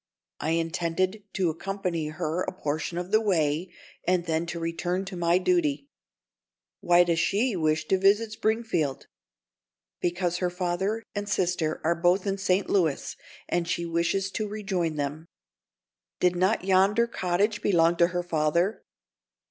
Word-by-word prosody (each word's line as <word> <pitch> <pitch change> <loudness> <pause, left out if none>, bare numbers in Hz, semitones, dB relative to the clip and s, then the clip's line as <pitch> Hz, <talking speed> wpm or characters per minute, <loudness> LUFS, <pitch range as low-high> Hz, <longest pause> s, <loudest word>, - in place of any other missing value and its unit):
"I 160 - 0
intended 170 +5 -1
to 180 -4 +1
accompany 180 -2 -3
her 155 +3 -2
a - - -2
portion 155 -1 -3
of 180 +2 -4
the 215 +1 +4
way, 170 -4 0 0.3
and 180 -1 +1
then 165 0 -1
to 170 0 -4
return 175 +3 -2
to 195 -1 -7
my 170 0 +2
duty." 150 -6 +1 0.9
"Why 175 0 +5
does 170 -2 +1
she 210 +7 +1
wish 155 -2 0
to 190 - +3
visit 205 +3 +3
Springfield?" 215 - -1 0.9
"Because 175 0 -1
her 180 0 0
father 185 +5 -2
and 205 0 -4
sister 175 -5 0
are 165 +2 +3
both 175 +3 +2
in 195 0 -1
St. 190 0 +1
Louis, 165 -8 0 0.3
and 175 -1 -1
she 170 -1 -1
wishes 170 +4 0
to 215 +1 -2
rejoin 195 -6 -2
them." 145 +3 -4 0.9
"Did 180 0 +3
not 185 +2 +1
yonder 195 +4 +4
cottage 205 0 0
belong 170 -3 +3
to 170 - +5
her 175 0 -2
father?" 170 +4 0
175 Hz, 150 wpm, -27 LUFS, 165-195 Hz, 0.9 s, Why